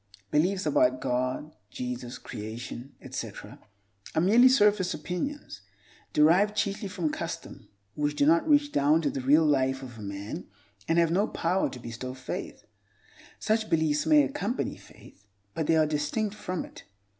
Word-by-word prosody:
Beliefs 185 +6 +1
about 315 +2 +3
God, 130 +4 -2
Jesus, 125 +1 -5
Creation, 120 +4 -8
etc., - - -7 0.6
are 160 - +3
merely 230 +8 +6
surface 210 -6 +3
opinions 180 - -5 0.5
(derived 180 +8 +4
chiefly 205 0 -1
from 180 -6 -2
custom) - - -6 0.2
which 145 0 -1
do 145 - +2
not 165 - +3
reach 290 0 +4
down 150 - +3
to 145 - +1
the 135 - -4
real 150 +5 +4
life 135 -2 +1
of 120 -3 -10
a - - -8
man 100 0 -6 0.4
and 165 - +2
have 170 -1 +4
no 200 +5 +2
power 180 +3 0
to - - -9
bestow 120 +2 -6
faith. 130 -1 -6 0.7
Such 220 0 0
beliefs 155 -2 +1
may 300 -1 +6
accompany 265 -5 -2
faith, 105 +1 -18 0.3
but 160 -2 -2
they 165 - +4
are 155 - +4
distinct 155 +8 -1
from 190 -4 -4
it. - - -14
160 Hz, 155 wpm, -28 LUFS, 130-205 Hz, 0.7 s, merely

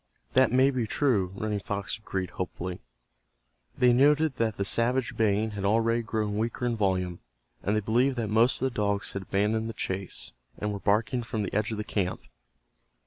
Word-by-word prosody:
"That 130 -2 +5
may 130 +2 +4
be 125 -4 -1
true," 105 -9 +1
Running 105 0 -2
Fox 100 +1 -4
agreed, 95 -4 -4
hopefully. 90 0 -5 1.0
They 125 -1 +5
noted 145 +2 +4
that 110 -2 0
the 100 - -1
savage 120 +4 +1
baying 110 0 +1
had 100 -2 -5
already 115 +3 +2
grown 110 -2 -2
weaker 115 +2 -2
in 120 -1 +1
volume, 95 -4 0 0.4
and 105 - 0
they 105 - +1
believed 125 +6 +2
that 115 -3 -2
most 115 +3 +4
of 130 - 0
the 130 - -2
dogs 100 -1 -1
had 100 - -3
abandoned 105 +4 0
the - - -5
chase, 95 -2 -2 0.3
and 105 0 -2
were 100 - -4
barking 110 +5 +1
from 115 -2 -3
the 100 - -4
edge 105 +1 +1
of 110 - -3
the 105 - -2
camp. 95 -3 -2
110 Hz, 190 wpm, -28 LUFS, 100-120 Hz, 1.0 s, That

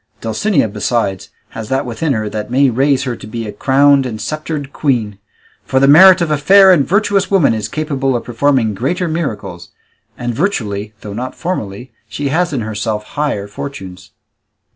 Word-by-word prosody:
Dulcinea, 115 - 0
besides, 100 -2 -2 0.2
has 110 -1 -8
that 135 0 0
within 135 +5 -2
her 110 -2 -2
that 105 +2 -5
may 135 +1 +3
raise 135 +2 +1
her 125 -3 -3
to 105 - -11
be 115 +1 -5
a 105 - -5
crowned 135 +4 +3
and 110 -3 -6
sceptred 150 +3 -5
queen; 115 -8 -1 0.4
for 130 - 0
the 135 - +4
merit 180 +5 +8
of 165 -2 0
a 150 - +1
fair 195 +5 +6
and 145 -6 +2
virtuous 200 0 +1
woman 180 - +3
is 110 -2 -3
capable 135 -1 -2
of 120 - -2
performing 120 -2 +1
greater 170 - -2
miracles; 110 - -4 0.5
and 120 -1 -3
virtually, 110 - -2
though 105 - -7
not 125 +4 -5
formally, 125 - -5 0.2
she 140 +7 -3
has 175 +4 0
in 135 -5 -2
herself 110 0 -3
higher 145 -9 -2
fortunes." 95 -5 -8
130 Hz, 175 wpm, -15 LUFS, 110-150 Hz, 0.5 s, merit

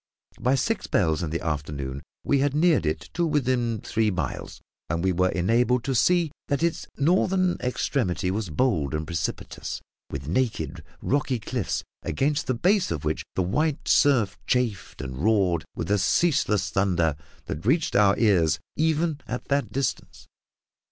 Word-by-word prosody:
By 130 +2 +2
six 205 - -1
bells 80 -5 +1
in 85 - -2
the 85 +2 -3
afternoon 70 -3 -3 0.2
we 140 - +2
had 140 +1 +1
neared 155 - +3
it 75 0 -1
to - - 0
within 130 -7 +1
three 110 -1 +1
miles, 90 -2 -4 0.3
and 85 +3 -1
were 90 0 +4
enabled 120 +7 +2
to 135 +1 -1
see 170 +6 +3 0.2
that 140 +2 0
its 170 -1 -1
northern 185 +4 +2
extremity 120 -7 -1
was 100 -1 -2
bold 80 - +1
and 75 +1 -2
precipitous, 85 0 -4 0.3
with 70 -1 -6
naked, 115 +8 -1 0.2
rocky 135 -2 +1
cliffs, 115 -1 -3 0.2
against 140 - 0
the 130 - +1
base 190 - +2
of 75 -3 -3
which 75 0 -1
the 95 - +1
white 150 - 0
surf 120 -9 +3
chafed 120 -8 -1
and 65 0 -6
roared 95 -3 +2
with 90 - -3
a 105 - +3
ceaseless 120 - +2
thunder 90 -6 +2 0.3
that 75 - -5
reached 145 - +1
our 100 -1 +5
ears 85 -9 +3 0.2
even 160 -1 +1
at 125 - -5
that 140 0 +1
distance. 135 -2 -3
115 Hz, 155 wpm, -25 LUFS, 85-140 Hz, 0.3 s, our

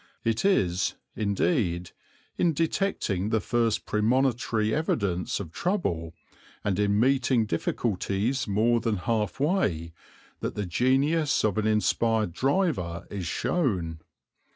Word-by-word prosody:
It 115 -1 0
is, 95 - +2 0.2
indeed, 100 - 0 0.4
in 170 -2 +2
detecting 155 - 0
the 110 - +2
first 115 0 0
premonitory 115 -1 +1
evidence 100 - -1
of 90 -6 -6
trouble, 85 - -2 0.5
and 100 -2 0
in 100 0 +2
meeting 130 -2 +3
difficulties 105 +5 -1
more 110 +4 +2
than 115 -2 -1
half 105 0 -1
way, 100 - 0 0.5
that - - -4
the 105 - -2
genius 135 - +2
of 105 -1 +1
an 110 - 0
inspired 110 -2 +1
driver 130 - 0
is 95 -5 -4
shown. 90 - -1
110 Hz, 115 wpm, -27 LUFS, 95-130 Hz, 0.5 s, meeting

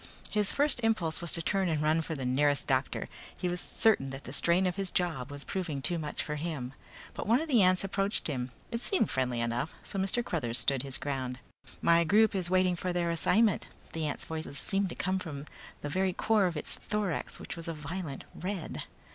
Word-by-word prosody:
His 210 -2 +3
first 290 -2 +2
impulse 215 -9 +1
was 170 - -4
to 165 - -2
turn 190 0 +1
and 155 -2 +1
run 155 +2 +3
for 160 0 -4
the 135 -3 -4
nearest 145 +3 +2
doctor. 135 0 0 0.3
He 180 - -1
was 175 0 -2
certain 215 -12 +2
that 135 +1 -7
the 130 - -7
strain 170 +5 +3
of 180 - 0
his 195 -1 -2
job 165 -10 -1
was 145 0 -5
proving 170 -7 -3
too 170 +5 -1
much 150 -1 -3
for 150 -1 -3
him. 145 -5 -4 0.4
But - - -5
one 230 +4 +5
of 320 - -3
the 250 -8 +5
ants 185 0 +5
approached 195 +1 -1
him. 130 -4 -1 0.2
It 230 0 -2
seemed 385 - +2
friendly 125 -2 0
enough, 120 +6 -1
so 195 - -3
Mr. 195 +5 +1
Cruthers 120 -8 -1
stood 130 +2 +6
his 135 -1 -5
ground. 130 -3 -3 0.5
"My 170 0 +6
group 215 +7 +4
is 185 -3 -1
waiting 185 -1 +3
for 180 +1 -2
their 175 -1 0
assignment." 205 +5 +3 0.3
The 160 -2 -1
ant's 145 - -3
voice 160 0 -4
seemed 195 +6 +1
to - - -6
be - - -21
coming 190 0 +1
from 150 -5 -6 0.4
the - - -3
very 185 +3 +1
core 215 0 +3
of 170 -3 -3
its - - -1
thorax 210 -6 -2
which - - -6
was 165 -1 -5
a 165 - -2
violent 150 -1 -5
red. 185 -2 -4
170 Hz, 220 wpm, -31 LUFS, 145-190 Hz, 0.5 s, stood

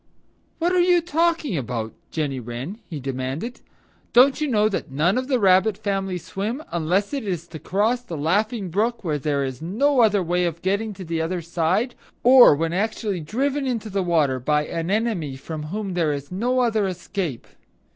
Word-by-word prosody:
"What 345 +1 +1
are 365 - +4
you 355 0 +5
talking 330 - 0
about, 120 -5 -3 0.2
Jenny 145 -5 -2
Wren?" 125 - -6
he 155 -4 -5
demanded. 135 - -4 0.5
"Don't 265 +4 +5
you 305 - +1
know 215 -5 +3
that 200 - -3
none 155 +8 +1
of 255 0 -1
the 260 -3 +1
Rabbit 190 +1 +4
family 195 -3 -2
swim 210 - -4
unless 180 - 0
it 275 -3 -2
is 175 -5 -3
to 160 - -8
cross 220 +9 0
the 200 -10 -7
Laughing 200 +6 0
Brook 225 +6 0
when 155 -4 -1
there 140 0 0
is 130 0 -6
no 250 - +1
other 210 -4 +4
way 175 +1 +1
of 170 -1 -4
getting 200 +3 -1
to 190 - -8
the 165 0 -2
other 170 +1 -2
side, 175 +9 0 0.3
or 250 - +8
when 165 +2 -1
actually 205 0 -1
driven 270 - -1
into 225 -4 -3
the 195 0 0
water 155 -7 +2
by 150 +4 +1
an 165 +2 -3
enemy 200 - -1
from 150 +3 -6
whom 200 +2 -4
there 165 -4 +1
is 140 +2 -6
no 245 +7 +1
other 220 -4 +1
escape? 180 - -4
190 Hz, 185 wpm, -23 LUFS, 160-230 Hz, 0.5 s, or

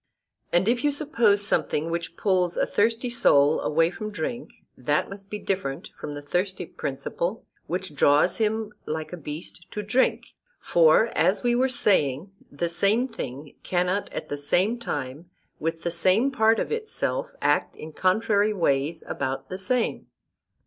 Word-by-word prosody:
And 175 +3 +2
if 240 +1 +1
you 295 - +4
suppose 235 -9 +3
something 160 -3 0
which 170 0 -4
pulls 180 -3 +1
a - - +2
thirsty 230 +3 0
soul 145 -10 +4
away 165 +2 +2
from 215 +3 -6
drink, 210 +6 -5 0.2
that 145 +8 0
must 200 0 -9
be 210 - -4
different 185 -10 -3
from 145 - -6
the 145 - -7
thirsty 180 +5 -1
principle 170 +9 -4 0.2
which 180 -1 -3
draws 145 +4 +3
him 220 -1 -1
like 155 +2 -4
a - - -2
beast 160 +3 -8
to 210 - -5
drink; 235 +6 0 0.3
for, 170 +7 +4
as 195 +2 +2
we 240 -1 +2
were 255 +2 +2
saying, 185 - +1 0.2
the 170 +4 -2
same 200 +8 +2
thing 140 - -7
cannot 180 +2 -1
at - - -5
the 145 - -3
same 185 +11 +1
time 145 - -5 0.3
with 165 +1 -3
the 170 - -1
same 185 +10 +2
part 225 -3 +3
of - - -2
itself 470 +2 -2
act - - +1
in 155 0 -9
contrary 205 +4 +2
ways 160 -3 0
about 135 -1 -4
the 185 - -5
same. 245 +4 -1
185 Hz, 160 wpm, -25 LUFS, 155-220 Hz, 0.3 s, you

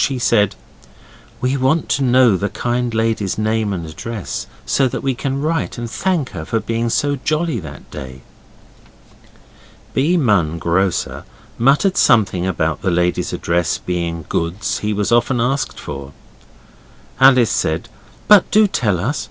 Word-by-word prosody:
She 135 - 0
said 110 -4 +2 0.9
'We 130 +2 0
want 135 +5 +1
to 140 - +1
know 125 -4 +5
the 100 +2 -1
kind 120 0 -2
lady's 110 -3 -1
name 110 -1 0
and 90 -4 -4
address, 100 +6 -6 0.2
so 135 - +2
that 125 - -5
we 135 -1 +1
can 135 +2 -3
write 160 0 -2
and 120 0 -4
thank 150 +5 -1
her 80 - -6
for 115 +7 -1
being 115 +1 -2
so 145 +5 0
jolly 155 -4 0
that 80 -6 -11
day.' 65 -2 -9 1.7
B. 160 +7 +2
Munn, 100 - +2
grocer, 85 +3 -1 0.4
muttered 145 - +3
something 95 -5 +3
about 80 -3 -1
the 95 - 0
lady's 90 0 0
address 85 0 0
being 85 -2 -3
goods 85 +6 -2
he 105 - -2
was 105 +1 -1
often 120 +1 +2
asked 135 +4 -1
for. 70 -1 -7 1.1
Alice 130 -4 +6
said, 85 -6 -1 0.4
'But 210 -3 +6
do 215 0 +5
tell 105 - 0
us. 130 +11 -1
115 Hz, 150 wpm, -18 LUFS, 90-135 Hz, 1.7 s, Alice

